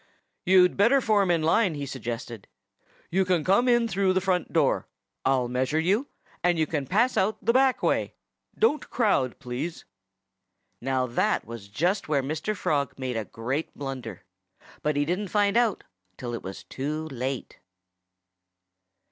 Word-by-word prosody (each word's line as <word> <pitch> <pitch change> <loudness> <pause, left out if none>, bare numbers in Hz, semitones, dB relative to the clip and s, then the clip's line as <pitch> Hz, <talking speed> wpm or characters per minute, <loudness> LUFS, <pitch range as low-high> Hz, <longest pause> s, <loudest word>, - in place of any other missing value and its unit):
"You'd 180 -1 +5
better 235 +8 +5
form 210 -6 +2
in 170 -2 +2
line!" 175 +2 +3
he 145 -1 -4
suggested. 120 -4 -6 0.6
"You 190 +3 +3
can 180 -4 +1
come 200 +9 +3
in 240 -1 +4
through 195 -3 +1
the 185 - +3
front 185 -2 0
door. - - +2 0.4
I'll 130 -2 +2
measure 130 +4 0
you. 200 - +1 0.4
And 175 -1 +3
you 160 - +2
can 145 -3 -3
pass 235 +7 +2
out 205 +3 +2
the 230 +3 +1
back 265 0 +3
way.... - - 0 0.4
Don't 305 -9 +1
crowd, 200 - +1
please!" 135 +5 -5 1.0
Now, 130 0 0
that 120 -1 0
was 115 -3 -9
just 175 - 0
where 140 -3 +2
Mr. 155 +9 -2
Frog 145 -7 -1
made 130 -2 -3
a 110 -1 -2
great 130 +10 -4
blunder. 125 -9 -6 0.6
But 150 -1 0
he 145 0 +1
didn't 180 +6 -1
find 205 +1 +2
it - - +6
out 230 -5 +1 0.3
till 120 -2 -5
it 115 - -4
was 95 +1 -8
too 150 +4 -4
late. 130 -1 -4
160 Hz, 160 wpm, -26 LUFS, 130-200 Hz, 1.0 s, it